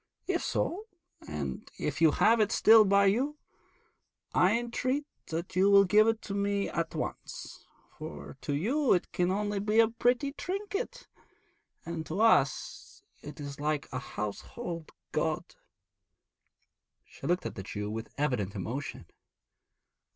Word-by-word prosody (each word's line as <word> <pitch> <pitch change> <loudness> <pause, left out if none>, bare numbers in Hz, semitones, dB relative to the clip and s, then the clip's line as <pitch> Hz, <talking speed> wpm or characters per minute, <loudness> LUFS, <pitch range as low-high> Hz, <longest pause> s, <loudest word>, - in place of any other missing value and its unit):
If 370 -2 0
so, 410 +6 -1 0.4
and 70 -4 -5
if 150 +1 -3
you 165 - +7
have 225 +9 +4
it 215 0 +3
still 220 -1 +7
by 200 0 +4
you, 260 +10 +1 1.0
I 190 +5 +4
entreat 255 +4 -1 0.2
that 170 +2 -4
you 190 +2 +5
will 200 0 +8
give 210 +3 +5
it 225 0 +1
to 200 - -5
me 200 0 0
at 170 -1 -2
once, - - -6 0.3
for 75 - -8
to 145 - -2
you 255 - +2
it 180 - 0
can 180 0 +1
only 205 +1 -1
be 210 +2 +2
a 225 - +7
pretty 245 +4 +1
trinket, 405 +9 -4 0.8
and 165 -1 -4
to 170 +5 -3
us 180 -12 +2 0.2
it 150 +2 -9
is 140 -1 -7
like 150 -1 -1
a 130 - -2
household 160 - -6 0.2
god.' - - -1 1.5
She - - -9
looked 175 +2 +1
at - - -3
the - - -6
Jew 105 +2 -5
with 110 +1 -5
evident 125 -9 -1
emotion. 115 +10 -5
195 Hz, 145 wpm, -30 LUFS, 145-230 Hz, 1.5 s, will